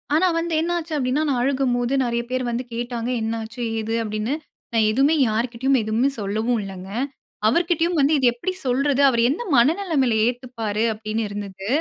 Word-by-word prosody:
ஆனா, 360 +4 +4
வந்து 335 0 -1
என்ன 340 +2 -1
ஆச்சு 330 -1 -5
அப்டினா 260 +2 0
நான் 260 -3 +1
அழுகும்போது 255 -2 +1
நெறைய 235 -1 0
பேர் 255 0 -1
வந்து 240 +2 -2
கேட்டாங்க. 240 0 -3
என்ன 220 +1 -1
ஆச்சு 235 +3 -8 0.2
ஏது 220 +1 -3
அப்டின்னு 215 +3 -2 0.4
நான் 220 -2 +3
எதுமே 275 +7 +3
யார்கிட்டயும் 240 +4 +1
எதுமே 220 +5 +1
சொல்லவு 215 +4 -1
இல்லங்க. 190 -1 -8 0.6
அவர்கிட்டயும் 340 +5 +2
வந்து 285 +2 +4
இத 265 - +1
எப்டி 245 +11 -3
சொல்றது 275 +2 +2
அவர் 235 -3 +1
எந்த 310 - -1
மனநிலமையில 275 - +3
ஏத்துப்பாரு 235 -4 -2
அப்டின்னு 215 +1 -3
இருந்தது. 200 -1 -6
245 Hz, 165 wpm, -22 LUFS, 220-275 Hz, 0.6 s, ஆனா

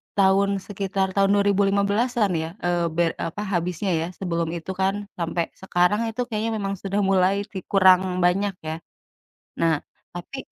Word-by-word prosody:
tahun 195 0 +4 0.2
sekitar 195 -1 -1
tahun 195 0 +4
2015-an 200 +2 +2
ya, - - -4 0.2
eee, 175 -1 +1
ber 170 -1 +2 0.2
apa, 205 +5 -6
habisnya 180 0 -1
ya. 165 - -2
Sebelum 170 -3 -1
itu 170 +3 -5
kan, 190 +1 0 0.3
sampai 170 0 -2
sekarang 190 +4 +1
itu 225 +2 -3
kayaknya 225 0 -2
memang 195 0 -1
sudah 200 +1 -2
mulai 190 0 +3 0.2
vi 190 - -4
kurang 185 -2 +4
banyak, 195 +2 +2
ya. 160 +1 -4 0.8
Nah, 165 -1 +3 0.4
tapi, 175 +10 -7
190 Hz, 150 wpm, -24 LUFS, 175-200 Hz, 0.8 s, tahun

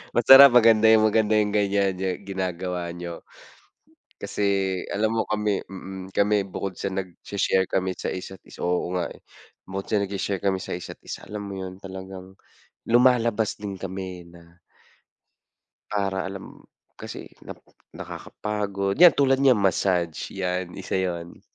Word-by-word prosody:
Masarap, 135 +4 +10
maganda 110 -1 +6
yung 110 -1 +6
maganda 110 0 +3
yung 105 -1 +1
ganyan 100 -2 +1
niyo 95 +1 -3 0.2
ginagawa 90 -2 -3
niyo. 85 0 -7 1.0
Kasi 105 - -4 0.5
alam 110 +2 0
mo 115 - +1
kami 105 -2 0
mm, 95 -1 -9
kami 105 +1 +2
bukod 95 0 -5
sa 100 - -3
nag-sha-share 95 0 -1
kami 95 0 0
sa - - -4
isa't 95 0 -7
isa - - -7
oo 90 0 0
nga 90 - -1
eh, - - -18 0.4
bukod 95 +1 -6
sa 105 -2 +1
nag-sha-share 100 -1 -3
kami 95 -1 +1
sa - - -6
isa't 90 - -8
isa, - - -7
alam 105 0 -5
mo 100 - -6
yun, 95 -1 -7
talagang 95 -1 -9 0.6
lumalabas 120 -3 +3
din 100 -2 -5
kami 95 -1 -6
na 85 0 -18 1.3
para, 95 -2 -1
alam 95 0 -10 0.3
kasi - - -9
nap - - -9 0.4
nakakapagod, 100 -2 -4
yan, 175 - +11
tulad 135 -1 +3
niyan, 130 -4 +5
massage, 90 -4 0
yan 90 -1 -3
isa - - -6
'yon. 85 -2 -5
95 Hz, 145 wpm, -24 LUFS, 95-105 Hz, 1.3 s, yan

